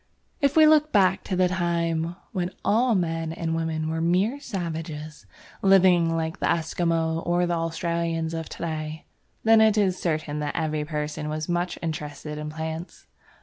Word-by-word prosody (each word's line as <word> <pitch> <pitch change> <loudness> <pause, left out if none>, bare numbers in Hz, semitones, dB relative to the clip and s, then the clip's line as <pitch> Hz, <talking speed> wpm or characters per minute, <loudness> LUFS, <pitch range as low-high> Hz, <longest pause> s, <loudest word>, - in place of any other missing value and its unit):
If 280 +2 +2
we 315 - +8
look 305 0 +5
back 190 -2 +3
to 190 - -2
the 180 0 +3
time 170 -2 -1 0.2
when 180 -5 -1 0.2
all 235 +2 +3
men 165 -3 -1
and 165 0 -3
women 160 -1 -2
were 160 0 -2
mere 190 +11 +1
savages, 160 - -5 0.3
living 180 -4 +5
like 160 0 -3
the - - 0
Esquimaux 165 0 0
or 175 +1 +1
the 175 - -1
Australians 165 0 -1
of 165 -1 -4
to - - -7
day, 155 -1 -4 0.4
then 225 0 +6
it 220 -1 +4
is 190 -3 +1
certain 155 -3 -1
that 145 -1 -3
every 155 -2 -1
person 150 0 -3
was 155 0 -3
much 175 0 -1
interested 150 -1 -5
in 150 0 -4
plants. 160 +2 -6
165 Hz, 165 wpm, -25 LUFS, 160-180 Hz, 0.4 s, we